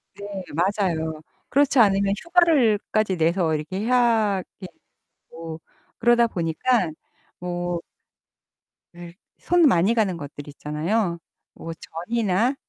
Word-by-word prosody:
네. 200 - -9 0.3
맞아요. 170 -4 -1 0.3
그렇지 280 -1 +3
않으면 200 -2 +4
휴가를 320 - +3
까지 215 -3 +1
내서 165 0 +1
이렇게 170 +6 -4
해야 225 -5 +2 0.2
예 185 - -6 0.6
되고 165 0 -8 0.4
그러다 240 0 +4
보니깐 170 +1 0 0.4
뭐 175 -1 -3 1.2
예. 175 -1 -10 0.2
손 350 -1 +2
많이 195 0 +3
가는 200 -7 0
것들 145 -1 -9
있잖아요. 170 +6 -2 0.3
뭐 165 - -8
전이나 215 - -1
190 Hz, 225 characters per minute, -23 LUFS, 165-230 Hz, 1.2 s, 않으면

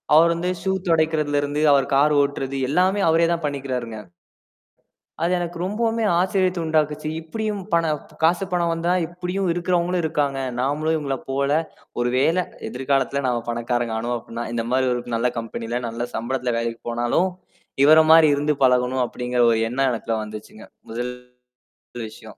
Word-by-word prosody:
அவர் 170 +1 +6
வந்து 180 +2 -2
ஷூ 190 - 0 0.2
தொடைக்குறதுல 155 -3 +2
இருந்து, 145 +1 -2
அவர் 135 -1 +2
கார் 150 +2 +4
ஓட்டுறது 135 -1 -2
எல்லாமே 185 +5 +2
அவரே 165 +1 +4
தான் 170 - -3
பண்ணிக்கிறாருங்க. 130 -6 -3 1.2
அது 170 +2 +1
எனக்கு 175 0 -4
ரொம்பவுமே 225 +3 -1 0.2
ஆச்சரியத்த 185 -1 +1
உண்டாக்குச்சு. 155 -1 0
இப்பிடியும் 210 +4 -3
பண 170 0 +4 0.4
காசு, 175 +4 +3
பணம் 170 -1 +1
வந்தா 165 +1 -1 0.2
இப்பிடியும் 180 +2 -3
இருக்கிறவங்களும் 175 0 0
இருக்காங்க. 145 -3 0 0.2
நாமளும் 150 +5 0
இவுங்கள 140 -4 -2
போல 140 +1 0 0.5
ஒருவேள 130 +8 +2 0.3
எதிர்காலத்தில 135 +3 0
நாம 120 -2 -1
பணக்காரங்க 120 -1 -1
ஆனோம் 120 +2 -2
அப்புட்ன்னா, 115 0 -6
இந்தமாரி 125 +3 0
ஒரு 120 - -2
நல்ல 120 +2 +1
கம்பெனில, 115 +1 -4
நல்ல 115 +1 -4
சம்பளத்துல 125 +1 -2
வேலைக்கு 115 0 -3
போனாலும், 120 +10 +1 0.5
இவர 155 +2 +8
மாரி 160 -1 +8
இருந்து 145 +1 0
பழகணும் 125 0 +3
அப்பிடிங்கிற 125 0 -1
ஒரு 115 - +2
எண்ணம் 135 +2 +1
எனக்குள்ள 115 -1 -2
வந்துச்சுங்க. 110 0 -10 0.2
முதல் 120 +2 -3 0.9
விஷயம். 110 -1 -13
140 Hz, 140 wpm, -22 LUFS, 120-170 Hz, 1.2 s, இவர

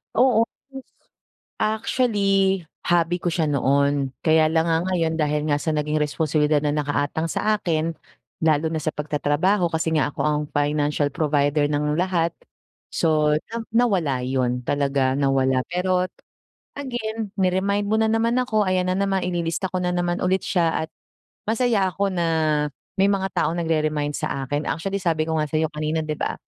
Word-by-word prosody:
Oo, 240 -3 +4 0.2
yes. 270 -1 -9 0.8
Actually, 205 -4 +1 0.2
hobby 175 0 +2
ko 175 - +1
siya 160 -1 0
noon, 140 -1 +1
kaya 155 -1 +3
lang 160 +1 +2
nga 165 0 +1
ngayon 165 -3 0
dahil 150 -1 0
nga 145 - +2
sa 155 +2 -1
naging 150 0 -1
responsibilidad 150 0 +1
na 145 0 -1
nakaatang 150 +2 -1
sa 215 0 +1
akin, 165 -4 -1 0.5
lalo 155 0 +3
na 160 -1 -3
sa 155 - 0
pagtatrabaho 155 +5 0
kasi 160 0 0
nga 150 -1 +1
ako - - -14
ang 150 0 +1
financial 145 0 +1
provider 145 -1 +1
ng 150 0 0
lahat. 170 -1 0 0.6
So, 155 -2 +2 0.2
na 225 - -8 0.2
nawala 195 - +2
yun 125 -1 0
talaga, 140 -2 +1
nawala. 135 -2 +2
Pero 180 +1 +1 0.7
again 225 -6 -4
ni-remind 195 +2 +1
mo 215 - +1
na 220 0 +2
naman 230 +1 +1
ako, 215 -5 +1
ayan 185 0 +1
na - - 0
naman, 195 -1 0
ililista 175 +1 -2
ko 185 - -1
na 180 0 -1
naman 175 0 0
ulit 185 +1 +1
siya 165 -3 +1
at 160 - -7 0.5
masaya 220 -3 +1
ako 195 +2 -1
na 170 -2 0 0.7
may 195 - +5
mga 195 -1 0
taong 165 +3 0
nagre-remind 155 -3 0
sa 135 - -3
akin. 145 +3 -2
Actually, 195 +5 -2
sabi 165 -3 +1
ko 160 0 0
nga 155 - 0
sa'yo 155 +1 +1
kanina 155 +1 -1
'di 155 0 -2
ba, - - -1
160 Hz, 165 wpm, -23 LUFS, 150-190 Hz, 0.8 s, may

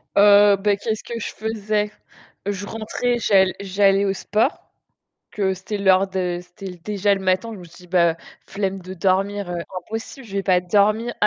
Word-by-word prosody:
Heu, 205 0 +7
bah 205 +1 +2
qu'est-ce 215 +2 -3
que 235 -1 -5
je - - -4
faisais? 215 -1 -2 0.5
Je 200 0 -3
rentrais, 225 +3 -2
j'all 190 -4 +4
j'allais 195 0 +2
au 195 - +1
sport. 215 +6 +1 0.9
Parce 200 -2 0
que - - +1
c'était 195 +3 -5
l'heure 190 -1 +4
de 180 -2 -2
c'était 180 +1 -10
déjà 205 0 +1
le 195 - -2
matin, 185 +4 0
je 205 - -9
me - - -11
suis 170 - -15
dit: - - -20
«Bah 170 -2 +3 0.3
flemme 195 -1 -2
de 185 +1 -9
dormir, 195 +1 0
impossible, 195 +8 -6
je 205 - -12
vais 195 - -1
pas 185 -2 +3
dormir.» 210 +5 +2
200 Hz, 180 wpm, -22 LUFS, 185-210 Hz, 0.9 s, Heu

